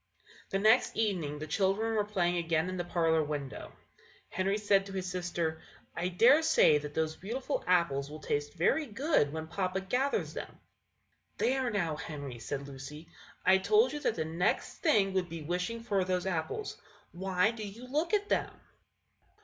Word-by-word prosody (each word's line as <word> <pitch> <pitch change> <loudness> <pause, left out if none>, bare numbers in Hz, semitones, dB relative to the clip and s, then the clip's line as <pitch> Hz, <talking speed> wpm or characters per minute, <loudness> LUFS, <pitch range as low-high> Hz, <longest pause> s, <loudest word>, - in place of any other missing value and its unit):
The 195 - 0
next 220 +4 +4
evening 180 -10 0
the 155 - -5
children 195 +7 +1
were 215 -1 +2
playing 180 -4 0
again 165 0 0
in 185 - -4
the 175 - -1
parlour 165 -2 +2
window. 145 -2 -5 0.6
Henry 195 +2 0
said 200 -2 +2
to 195 - -8
his 185 -1 -3
sister, 175 -3 -2 0.3
"I 170 +1 -1
dare 235 - +5
say 315 - +5
that 150 0 -8
those 160 0 0
beautiful 255 - -3
apples 170 -6 +2
will 155 - -7
taste 145 0 -2
very 280 - +2
good 235 - +1
when 160 +1 -4
papa 185 +3 -2
gathers 250 +9 -1
them." - - -7 0.8
"There, 260 -1 +1
now, 170 -8 -1
Henry!" 145 -6 -6
said 140 +5 -5
Lucy; 140 +4 -9 0.4
"I 190 +1 +6
told 430 - +3
you 295 - -3
that 230 - 0
the 160 - -2
next 165 +3 -1
thing 205 - +3
would 185 -2 0
be 165 -2 -6
wishing 180 +8 -2
for 200 -4 +1
those 180 0 -1
apples. 185 - -3 0.3
Why 190 +3 +1
do 230 -2 -9
you 210 +4 -7
look 305 +6 -1
at 410 0 -1
them?" - - 0
185 Hz, 175 wpm, -31 LUFS, 160-215 Hz, 0.8 s, I